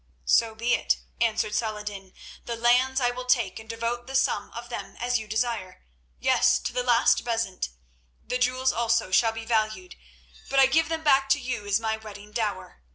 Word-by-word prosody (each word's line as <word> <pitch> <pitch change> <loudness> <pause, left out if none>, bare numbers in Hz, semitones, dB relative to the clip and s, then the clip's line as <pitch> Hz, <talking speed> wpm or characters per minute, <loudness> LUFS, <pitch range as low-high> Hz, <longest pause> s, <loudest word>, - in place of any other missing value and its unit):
"So 225 - +3
be 235 +2 0
it," - - +1 0.2
answered 220 -2 +1
Saladin. 210 -3 -4 0.3
"The 235 - -3
lands 250 +3 +3
I 245 -2 +2
will 250 +1 -7
take 235 -7 +1
and 220 0 -14
devote 235 +1 -3
the 270 - -6
sum 270 - +1
of 235 +1 -7
them 200 -5 -7
as 245 0 0
you 220 - -9
desire—yes, 185 - 0
to - - -4
the 250 - 0
last 240 -1 +3
bezant. 230 - -2 0.6
The 250 - -2
jewels 255 +1 +1
also 230 -3 +1
shall 225 +4 +4
be 225 0 -7
valued, 225 +10 -1 0.5
but 275 - -1
I 270 - +8
give 320 +4 +2
them 325 -1 -3
back 275 -2 +4
to 280 +1 +4
you 245 -5 -4
as 205 +1 +2
my 220 -1 -1
wedding 210 -1 -11
dower. 210 - -4
230 Hz, 185 wpm, -26 LUFS, 210-250 Hz, 0.6 s, I